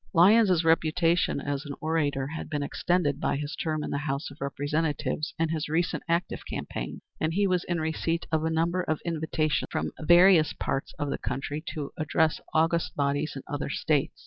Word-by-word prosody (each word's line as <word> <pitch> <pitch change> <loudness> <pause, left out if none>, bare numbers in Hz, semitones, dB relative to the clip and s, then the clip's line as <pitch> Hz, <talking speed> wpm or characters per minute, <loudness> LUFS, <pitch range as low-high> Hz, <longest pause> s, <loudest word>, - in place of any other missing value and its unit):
Lyons's 185 0 +6
reputation 165 0 +2
as 140 0 -3
an 145 -2 -6
orator 150 -4 0
had 155 +3 -6
been 145 -2 -1
extended 155 -1 0
by - - 0
his 145 +1 -4
term 155 -2 -2
in - - -4
the 140 - -1
House 140 0 -3
of 140 - -15
Representatives 150 +2 -1
and 160 -1 0
his 155 -2 -2
recent 170 +3 0
active 170 +2 0
campaign, 60 - -5 0.2
and 160 +1 0
he 200 +1 +3
was 180 -2 +1
in 175 -1 -1
receipt 160 +1 -1
of 160 -1 +1
a 160 - +1
number 165 +3 +1
of 155 -4 -1
invitations 160 -2 0
from - - -2
various 175 0 +6
parts 135 - -3
of 145 -2 -2
the - - -2
country 140 +4 -3
to 145 -3 -4
address 155 0 +1
august 165 +1 +1
bodies 145 +1 0
in 135 - -6
other 145 -1 -3
States. 145 0 0
155 Hz, 185 wpm, -27 LUFS, 145-165 Hz, 0.2 s, Lyons's